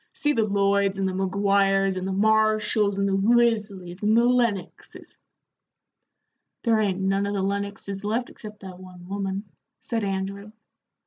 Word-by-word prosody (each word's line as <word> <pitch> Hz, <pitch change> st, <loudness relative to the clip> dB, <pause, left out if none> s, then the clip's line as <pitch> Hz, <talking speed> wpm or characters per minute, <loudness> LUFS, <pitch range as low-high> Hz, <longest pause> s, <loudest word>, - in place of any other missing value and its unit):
See 295 Hz, 0 st, +1 dB
the 225 Hz, -5 st, +1 dB
Lloyds 200 Hz, -1 st, +1 dB
and 195 Hz, -1 st, 0 dB
the 190 Hz, -, -2 dB
Maguires 195 Hz, 0 st, +1 dB
and 185 Hz, 0 st, -3 dB
the -, -, -2 dB
Marshalls 215 Hz, 0 st, +2 dB
and 200 Hz, 0 st, +1 dB
the 195 Hz, -, 0 dB
Risleys 205 Hz, -4 st, +1 dB
and 215 Hz, +2 st, +3 dB
the 235 Hz, -, +5 dB
Lennoxes 235 Hz, -7 st, -2 dB, 0.7 s
" -, -, -56 dB
"There 230 Hz, -2 st, +3 dB
ain't 195 Hz, -3 st, 0 dB
none 195 Hz, +1 st, 0 dB
of 205 Hz, -, -2 dB
the 195 Hz, -, -1 dB
Lennoxes 200 Hz, 0 st, -3 dB
left 225 Hz, +4 st, -2 dB
except 210 Hz, -1 st, -11 dB
that 185 Hz, -2 st, -10 dB
one 180 Hz, -1 st, -13 dB
woman," 195 Hz, 0 st, -3 dB, 0.4 s
said 225 Hz, -2 st, -3 dB
Andrew. 200 Hz, +1 st, -4 dB
200 Hz, 155 wpm, -24 LUFS, 195-215 Hz, 0.7 s, the